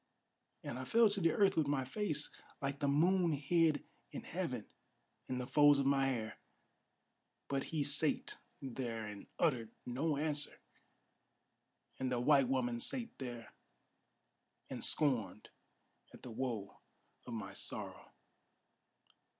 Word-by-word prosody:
And 125 Hz, -, -5 dB
I 130 Hz, -, -4 dB
fell 230 Hz, -, +5 dB
to 200 Hz, -1 st, -1 dB
the 165 Hz, -1 st, +4 dB
earth 195 Hz, -2 st, +4 dB
with 155 Hz, -3 st, +2 dB
my 140 Hz, -2 st, 0 dB
face, 155 Hz, 0 st, -1 dB, 0.3 s
like 140 Hz, 0 st, -3 dB
the 145 Hz, -, +1 dB
moon 170 Hz, +4 st, +3 dB
hid 150 Hz, +1 st, +2 dB, 0.3 s
in -, -, -6 dB
heaven, -, -, -3 dB, 0.6 s
In 130 Hz, -, -1 dB
the 125 Hz, -, -2 dB
folds 145 Hz, +2 st, +6 dB
of 140 Hz, -, +1 dB
my 135 Hz, 0 st, +3 dB
hair. 115 Hz, -5 st, -3 dB, 1.1 s
But 135 Hz, -1 st, -1 dB
he 155 Hz, -3 st, -1 dB
sate 145 Hz, +2 st, +1 dB, 0.2 s
there 120 Hz, -4 st, -4 dB
and 105 Hz, -1 st, -8 dB
uttered 125 Hz, -9 st, +1 dB, 0.2 s
no 140 Hz, +5 st, 0 dB
answer; 150 Hz, -1 st, -2 dB, 1.4 s
And 130 Hz, -1 st, -1 dB
the 125 Hz, -, +1 dB
white 135 Hz, +1 st, +5 dB
woman 120 Hz, -2 st, 0 dB
sate 235 Hz, -, +2 dB
there, 120 Hz, -3 st, -7 dB, 1.2 s
and -, -, -4 dB
scorned 120 Hz, -8 st, +1 dB, 0.7 s
at -, -, -16 dB
the 125 Hz, -, -7 dB
woe 110 Hz, -5 st, -4 dB, 0.5 s
of 120 Hz, -, -5 dB
my 100 Hz, -3 st, -5 dB
sorrow. -, -, -3 dB
140 Hz, 135 wpm, -36 LUFS, 125-155 Hz, 1.4 s, folds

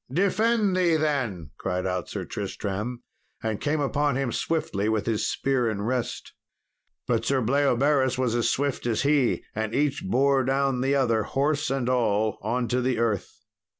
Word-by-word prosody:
"Defend 205 Hz, -, +2 dB
thee, 175 Hz, -3 st, +3 dB
then," 130 Hz, -, -1 dB
cried 90 Hz, +1 st, -2 dB
out 90 Hz, -1 st, -2 dB
Sir -, -, -4 dB
Tristram, 105 Hz, +5 st, -4 dB, 0.4 s
and 110 Hz, -2 st, -2 dB
came 150 Hz, +1 st, 0 dB
upon 145 Hz, 0 st, +1 dB
him 135 Hz, -2 st, -1 dB
swiftly 110 Hz, -12 st, -1 dB
with 110 Hz, -2 st, 0 dB
his 115 Hz, -2 st, 0 dB
spear 130 Hz, -4 st, 0 dB
in 100 Hz, -2 st, -3 dB
rest. 125 Hz, +1 st, -3 dB, 0.7 s
But -, -, +1 dB
Sir 135 Hz, -1 st, +1 dB
Bleoberis 135 Hz, +1 st, +2 dB
was 125 Hz, -3 st, 0 dB
as 120 Hz, -1 st, +1 dB
swift 140 Hz, -3 st, -1 dB
as 115 Hz, +1 st, 0 dB
he, 140 Hz, -3 st, +2 dB
and 110 Hz, +1 st, -3 dB
each 145 Hz, 0 st, 0 dB
bore 135 Hz, +6 st, +2 dB
down 135 Hz, 0 st, +1 dB
the 135 Hz, +2 st, +2 dB
other, 120 Hz, -5 st, +2 dB
horse 145 Hz, +6 st, 0 dB
and 135 Hz, -2 st, -1 dB
all, 110 Hz, -4 st, +1 dB
on 120 Hz, +4 st, -1 dB
to 125 Hz, 0 st, +1 dB
the 125 Hz, -1 st, 0 dB
earth. 105 Hz, -2 st, -2 dB
130 Hz, 165 wpm, -26 LUFS, 110-140 Hz, 0.7 s, thee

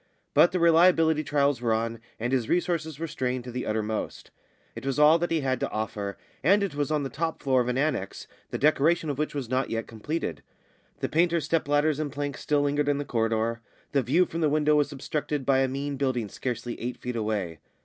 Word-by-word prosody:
But 175 Hz, -, +6 dB
the 180 Hz, -, 0 dB
reliability 165 Hz, -2 st, +5 dB
trials 140 Hz, -4 st, +1 dB
were 115 Hz, -2 st, +1 dB
on, 115 Hz, +1 st, -2 dB, 0.2 s
and 120 Hz, +3 st, -1 dB
his 125 Hz, -4 st, 0 dB
resources 165 Hz, -4 st, 0 dB
were 165 Hz, -, -3 dB
strained 130 Hz, -5 st, -2 dB
to 125 Hz, -, -7 dB
the 125 Hz, +1 st, -4 dB
uttermost. 110 Hz, 0 st, -3 dB, 0.4 s
It -, -, -7 dB
was 135 Hz, 0 st, -2 dB
all 150 Hz, +2 st, +6 dB
that 175 Hz, -, -1 dB
he 165 Hz, -2 st, +1 dB
had 130 Hz, -1 st, 0 dB
to -, -, -1 dB
offer, 105 Hz, -2 st, -4 dB, 0.3 s
and 200 Hz, +7 st, +4 dB
it 195 Hz, -, -2 dB
was 145 Hz, 0 st, -1 dB
on 150 Hz, -2 st, 0 dB
the 135 Hz, -, -3 dB
top 160 Hz, +2 st, -2 dB
floor 130 Hz, -2 st, +3 dB
of 120 Hz, -, -2 dB
an 125 Hz, 0 st, 0 dB
annexe, 135 Hz, -9 st, -1 dB, 0.2 s
the -, -, -3 dB
decoration 155 Hz, +2 st, +2 dB
of 140 Hz, -, -6 dB
which 150 Hz, -1 st, -2 dB
was 135 Hz, -4 st, -3 dB
not 130 Hz, +2 st, 0 dB
yet 115 Hz, 0 st, -2 dB
completed. 150 Hz, +9 st, -4 dB, 0.6 s
The -, -, 0 dB
painters' 170 Hz, 0 st, +2 dB
step 165 Hz, -3 st, 0 dB
ladders 145 Hz, +1 st, +2 dB
and 150 Hz, -2 st, -2 dB
planks 145 Hz, 0 st, -4 dB
still 145 Hz, -1 st, +1 dB
lingered 145 Hz, 0 st, +1 dB
in 145 Hz, -, +2 dB
the 145 Hz, -, -3 dB
corridor. 115 Hz, -1 st, 0 dB, 0.3 s
The 140 Hz, -, +2 dB
view 170 Hz, +9 st, +3 dB
from 165 Hz, 0 st, -5 dB
the 155 Hz, -, +3 dB
window 150 Hz, 0 st, +3 dB
was 145 Hz, 0 st, +2 dB
obstructed 145 Hz, 0 st, -3 dB
by 135 Hz, 0 st, +3 dB
a 135 Hz, -, +3 dB
mean 140 Hz, +2 st, -3 dB
building 130 Hz, -6 st, -1 dB
scarcely 120 Hz, 0 st, -4 dB
eight 120 Hz, +1 st, -3 dB
feet 125 Hz, -1 st, -5 dB
away. 105 Hz, -8 st, -2 dB
140 Hz, 220 wpm, -27 LUFS, 120-155 Hz, 0.6 s, But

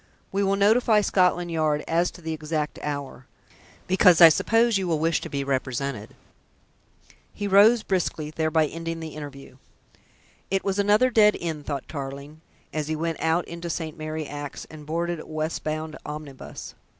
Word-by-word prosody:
We 195 Hz, -, 0 dB
will 195 Hz, 0 st, +2 dB
notify 215 Hz, +2 st, +4 dB
Scotland 180 Hz, -3 st, +2 dB
Yard 155 Hz, -2 st, 0 dB
as 170 Hz, +2 st, +2 dB
to 175 Hz, -, -15 dB
the 160 Hz, 0 st, -3 dB
exact 155 Hz, -1 st, -3 dB
hour, 140 Hz, -3 st, -5 dB, 0.6 s
because 180 Hz, -2 st, +5 dB
I 165 Hz, -2 st, +11 dB
suppose 225 Hz, +6 st, +2 dB
you 190 Hz, -, -2 dB
will 165 Hz, -2 st, +1 dB
wish 165 Hz, +1 st, +1 dB
to -, -, -6 dB
be 140 Hz, -1 st, -2 dB
represented." 130 Hz, -3 st, -3 dB, 1.2 s
He 205 Hz, -, -4 dB
rose 210 Hz, +4 st, +6 dB
briskly, 165 Hz, -6 st, -1 dB
thereby 160 Hz, 0 st, +1 dB
ending 165 Hz, +2 st, -5 dB
the 160 Hz, -1 st, -6 dB
interview. 140 Hz, -3 st, -9 dB, 0.9 s
It 195 Hz, 0 st, 0 dB
was 195 Hz, 0 st, -1 dB
another 210 Hz, +5 st, +4 dB
dead 210 Hz, -2 st, +5 dB
end, 160 Hz, -4 st, -5 dB
thought 140 Hz, -3 st, -4 dB
Tarling, 140 Hz, +1 st, -7 dB, 0.3 s
as 155 Hz, -1 st, -2 dB
he 155 Hz, -, -1 dB
went 165 Hz, +1 st, -3 dB
out 165 Hz, +2 st, +1 dB
into 170 Hz, 0 st, -6 dB
St. 160 Hz, -2 st, -4 dB
Mary 155 Hz, 0 st, -4 dB
Axe 145 Hz, -1 st, -7 dB
and 150 Hz, -1 st, -11 dB
boarded 170 Hz, +1 st, -2 dB
a -, -, -10 dB
westward 155 Hz, +1 st, -3 dB
bound 155 Hz, 0 st, -3 dB
omnibus. 150 Hz, -3 st, -8 dB
160 Hz, 165 wpm, -25 LUFS, 150-180 Hz, 1.2 s, I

